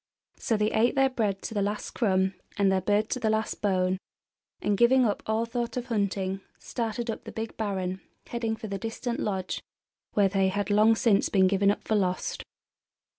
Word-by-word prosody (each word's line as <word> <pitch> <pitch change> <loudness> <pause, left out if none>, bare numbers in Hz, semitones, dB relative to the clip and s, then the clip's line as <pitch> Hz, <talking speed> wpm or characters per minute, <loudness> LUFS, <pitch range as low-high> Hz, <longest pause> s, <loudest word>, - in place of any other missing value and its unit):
So 225 - +1
they 210 +1 +1
ate 235 +3 +2
their 270 -1 +3
bread 210 -6 -1
to - - -4
the 205 - 0
last 205 +1 -2
crumb 190 -4 +1 0.2
and 200 -1 +3
their 190 0 +2
bird 205 +3 +2
to 255 - 0
the 225 -3 +1
last 220 0 -1
bone, 185 -2 +1 0.6
and, 205 - +1
giving 245 +4 +5
up 210 - 0
all 220 +1 +1
thought 235 0 -3
of 245 - -2
hunting, 195 -3 -1 0.2
started 235 0 -3
up - - -7
the - - -8
big 225 0 -5
barren, 190 -3 -2 0.2
heading 230 -2 -2
for 220 - -8
the 200 -2 -4
distant 230 +3 -3
Lodge, 190 -3 -2 0.5
where 205 -2 +4
they 195 0 +2
had 205 +1 -1
long 215 +2 +5
since 215 -3 +3
been 190 -2 +4
given 195 +1 +3
up 205 - 0
for - - +1
lost. 185 -3 0
210 Hz, 195 wpm, -28 LUFS, 195-225 Hz, 0.6 s, giving